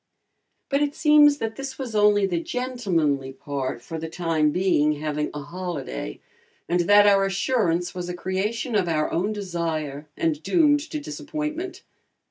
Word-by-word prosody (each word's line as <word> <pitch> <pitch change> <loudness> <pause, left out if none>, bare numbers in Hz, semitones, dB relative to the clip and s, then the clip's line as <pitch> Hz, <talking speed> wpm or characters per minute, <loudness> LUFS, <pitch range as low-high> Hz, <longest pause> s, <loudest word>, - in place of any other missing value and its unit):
But 275 +1 +1
it 290 0 0
seems 300 -2 +6
that 225 -4 -4
this 275 -1 -6
was 255 -4 -5
only 205 -1 +4
the 175 -3 -1
"gentlemanly 170 - -1
part," 135 -4 -4
for 160 +4 -6
the 160 0 -5
time 165 -2 +1
being 150 -3 +2
having 150 0 -2
a 150 -1 -6
holiday, 145 - -5 0.5
and 175 +1 +1
that 205 0 +8
our 200 -1 +5
assurance 190 -3 0
was 180 -1 -5
a 180 - -3
creation 205 +7 -2
of 190 -4 +2
our 155 -2 0
own 190 +6 0
desire 165 -7 -3
and 155 -2 0
doomed 295 - +4
to 305 - -3
disappointment. 310 +3 -5
185 Hz, 155 wpm, -24 LUFS, 155-250 Hz, 0.5 s, that